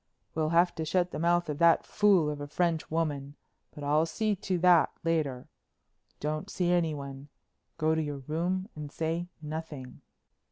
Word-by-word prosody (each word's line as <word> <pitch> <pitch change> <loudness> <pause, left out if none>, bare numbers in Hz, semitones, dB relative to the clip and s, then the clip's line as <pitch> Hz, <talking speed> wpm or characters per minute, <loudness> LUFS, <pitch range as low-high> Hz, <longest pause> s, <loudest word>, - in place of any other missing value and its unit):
We'll 155 -1 0
have 170 +2 +4
to 160 - -1
shut 180 +2 +1
the - - -4
mouth 175 +1 +2
of 150 -1 -4
that 170 -1 +5
fool 195 -7 +3
of 145 -1 -6
a 145 - -5
French 165 +1 0
woman, 145 -3 -2 0.3
but 150 - -10
I'll 150 +3 +2
see 215 +4 0
to 185 0 -2
that 175 -1 +5
later. 155 -6 -1 0.7
Don't 155 +6 -3
see 175 -3 0
anyone. 145 -5 -1 0.5
Go 155 0 +2
to 160 - +1
your 145 -3 -4
room 180 +5 -1
and 150 -2 -7
say 165 +3 -2 0.2
nothing." 150 -4 -6
160 Hz, 165 wpm, -29 LUFS, 150-175 Hz, 0.7 s, that